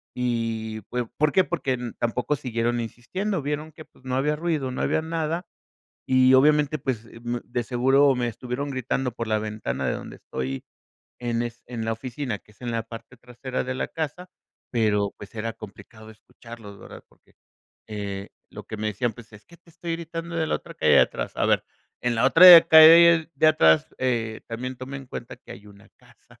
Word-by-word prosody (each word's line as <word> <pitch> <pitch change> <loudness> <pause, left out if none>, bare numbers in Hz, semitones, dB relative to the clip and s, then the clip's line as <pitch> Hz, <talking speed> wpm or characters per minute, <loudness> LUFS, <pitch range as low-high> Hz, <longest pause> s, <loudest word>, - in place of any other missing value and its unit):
Y 115 -3 -2
fue, 125 -1 -3
¿por 150 +5 0
qué? 190 - +5
Porque 135 -7 -2 0.2
tampoco 125 +5 -1
siguieron 120 -2 -2
insistiendo, 185 - -4
vieron 150 +2 -4
que 155 - -12
pues - - -26
no 130 0 -2
había 150 +3 +1
ruido, 155 -5 -2
no 125 - -4
había - - +1
nada, 165 +1 -3 0.6
y 130 0 +5
obviamente, 150 +2 +3
pues, 125 -4 -3 0.2
mm, 120 0 -2
de 120 0 -3
seguro 135 +3 +3
me 125 -1 -1
estuvieron 125 +4 -5
gritando 130 0 -2
por 115 0 -5
la 110 0 +1
ventana 105 -12 -4
de - - 0
donde - - -9
estoy, 65 +1 -5 0.6
en 120 -1 -1
es 120 0 -7
en 120 -2 -5
la 115 - -1
oficina, 120 0 -5
que - - -25
es 105 - -30
en 120 - -3
la 115 0 -1
parte 115 +2 -11
trasera 125 +2 -5
de 130 0 -4
la - - -2
casa, 165 +3 -5 0.4
pero 105 -4 +1
pues 100 - -11
era 115 +1 -3
complicado 110 +1 -13
escucharlos, 110 -1 -13
¿verdad? - - -12
Porque - - -29 0.5
eh, 100 -2 -5 0.2
lo - - -9
que 110 - -7
me 110 0 -2
decían, 115 +3 -2
pues: 115 -1 -15
"Es 105 0 -15
que 170 - -17
te 170 0 -24
estoy 170 0 -6
gritando 170 0 -6
de 160 - 0
la - - -1
otra - - -13
calle - - +2
de - - +8
atrás". - - -1
A - - +1
ver, - - +2 0.4
en 120 -1 0
la 115 - +2
otra 170 +4 +10
calle 165 0 +8
de - - +3
atrás, 80 - +4
eh 115 -4 -1
también 125 +3 -5
toma 130 +2 -7
en 135 -1 -10
cuenta - - -8
que - - -13
hay 100 +2 -14
una 100 -1 -17
casa, - - -23
125 Hz, 200 wpm, -24 LUFS, 115-150 Hz, 0.6 s, otra